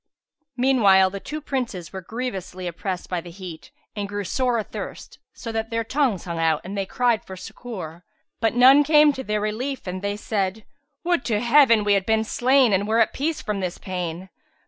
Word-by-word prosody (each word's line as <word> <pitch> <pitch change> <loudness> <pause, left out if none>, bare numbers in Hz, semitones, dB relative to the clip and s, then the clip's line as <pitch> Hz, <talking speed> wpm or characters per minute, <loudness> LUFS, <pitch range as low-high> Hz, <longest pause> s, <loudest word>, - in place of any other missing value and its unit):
Meanwhile 205 -8 +4
the 200 - -5
two 300 +9 -6
Princes 240 - -4
were 190 - -5
grievously 190 -4 -5
oppressed 180 +2 -4
by 180 -2 -2
the 175 - -11
heat 175 -2 -10 0.3
and 200 -1 -4
grew 205 0 -3
sore 250 +4 0
athirst, 220 - -7 0.2
so 230 - -6
that 225 0 -3
their 230 0 -1
tongues 255 - 0
hung 170 -2 -5
out 160 -1 +2
and 190 +3 -6
they 195 -1 -2
cried 240 -1 +1
for 190 - -9
succour, 185 -6 -8 0.4
but 225 -1 +1
none 265 +4 +7
came 300 0 +5
to 265 - -6
their 210 -3 -1
relief 245 +6 -3
and 185 0 -5
they 200 0 -2
said, 205 -1 -2 0.4
"Would 345 -5 +1
to 215 -4 +1
Heaven 235 -2 +5
we 205 0 +3
had 195 -1 +1
been 220 0 +2
slain 250 +1 +3
and 195 +2 +1
were 220 +1 +1
at 225 - +3
peace 310 +2 -2
from 210 -2 -2
this 185 -2 -3
pain! 180 -1 -5
210 Hz, 195 wpm, -23 LUFS, 190-250 Hz, 0.4 s, none